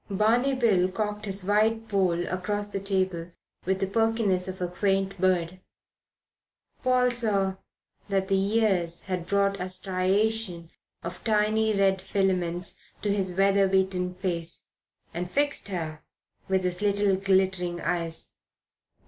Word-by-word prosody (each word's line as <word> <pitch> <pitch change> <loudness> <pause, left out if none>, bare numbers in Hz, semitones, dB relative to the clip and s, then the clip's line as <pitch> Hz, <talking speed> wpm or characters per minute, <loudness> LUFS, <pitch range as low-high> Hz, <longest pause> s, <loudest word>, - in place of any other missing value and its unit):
Barney 230 +7 +2
Bill 200 -8 +3
cocked 210 +2 -3
his 195 -1 -4
white 220 +3 +2
poll 180 -4 +1
across 205 +3 -2
the 200 - -3
table 185 -3 -1 0.3
with 190 +1 0
the - - +3
perkiness 215 -3 +1
of 185 0 -6
a 180 - -1
quaint 195 +1 -1
bird 185 -1 +1 1.2
Paul 250 -1 +3
saw 200 -5 0 0.5
that 195 -1 +1
the 195 - +2
years 195 -4 +1
had 180 -3 -4
brought 200 0 +1
a - - -1
striation 185 0 0 0.3
of 175 +1 -7
tiny 215 0 +2
red 195 -1 +2
filaments 185 -3 -1 0.2
to 205 -1 +1
his 190 -3 -1
weather 195 0 +4
beaten 190 -1 0
face 175 -3 -3 0.5
and 175 +1 -3
fixed 285 +3 +1
her 160 -5 -4 0.5
with 190 -1 +2
his 180 0 -1
little 205 -1 +2
glittering 190 -2 +1
eyes. 165 -1 -2
195 Hz, 130 wpm, -27 LUFS, 180-205 Hz, 1.2 s, weather